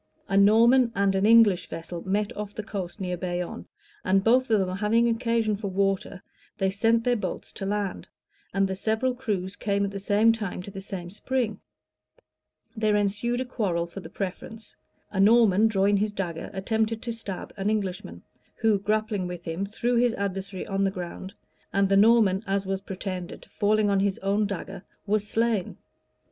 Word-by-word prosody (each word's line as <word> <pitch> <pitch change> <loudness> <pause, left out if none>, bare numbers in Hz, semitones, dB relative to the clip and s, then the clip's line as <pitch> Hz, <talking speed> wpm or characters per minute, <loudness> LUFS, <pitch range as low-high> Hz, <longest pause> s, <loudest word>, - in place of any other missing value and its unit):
A 195 - -1
Norman 230 +5 +5
and 200 0 +2
an 195 +2 +2
English 220 -6 +5
vessel 170 +1 -6
met 205 +1 0
off 210 0 -6
the 215 - -4
coast 195 -3 -6
near 180 -2 -2
Bayonne; 175 0 -4 0.4
and 190 +1 +2
both 250 +3 +3
of 220 -2 +4
them 185 -1 -1
having 225 +3 +2
occasion 230 -2 +1
for 200 0 -5
water, 195 0 -1 0.3
they 190 -1 +1
sent 225 +3 +2
their 245 0 +2
boats 220 - -5
to 195 - -5
land, 205 -1 -2 0.4
and 195 0 +1
the 190 - -3
several 220 +6 0
crews 205 -7 -3
came 200 -1 0
at 200 - -4
the 200 - -5
same 210 +3 +3
time 210 -5 -4
to 200 - -9
the 195 0 -7
same 185 -3 -7
spring: 235 +1 -2 1.2
there 215 -1 +1
ensued 210 +5 0
a - - -2
quarrel 195 -9 -1
for 170 +3 -9
the - - -10
preference: 215 +3 -6 0.4
a 195 - -3
Norman, 215 0 +5
drawing 200 -1 +2
his 210 +1 0
dagger, 175 -5 -4
attempted 220 +3 -1
to 235 - -3
stab 205 -5 -7
an 195 +1 -1
Englishman; 185 - -3 0.3
who, 220 -3 +2
grappling 210 -2 -1
with 175 -1 -7
him, 170 +4 -3
threw 240 +4 -1
his 240 -1 +3
adversary 195 -1 -4
on 195 0 -1
the 195 - +3
ground; 185 +1 -7 0.4
and 195 -1 +2
the 195 - +4
Norman, 205 -2 +5
as 195 0 0
was 195 0 -2
pretended, 185 -2 -6
falling 210 +1 +2
on 200 -1 +2
his 195 -1 +1
own 200 +2 +1
dagger, 195 -1 -6 0.2
was 210 0 0
slain. 225 -4 0
200 Hz, 180 wpm, -26 LUFS, 190-220 Hz, 1.2 s, Norman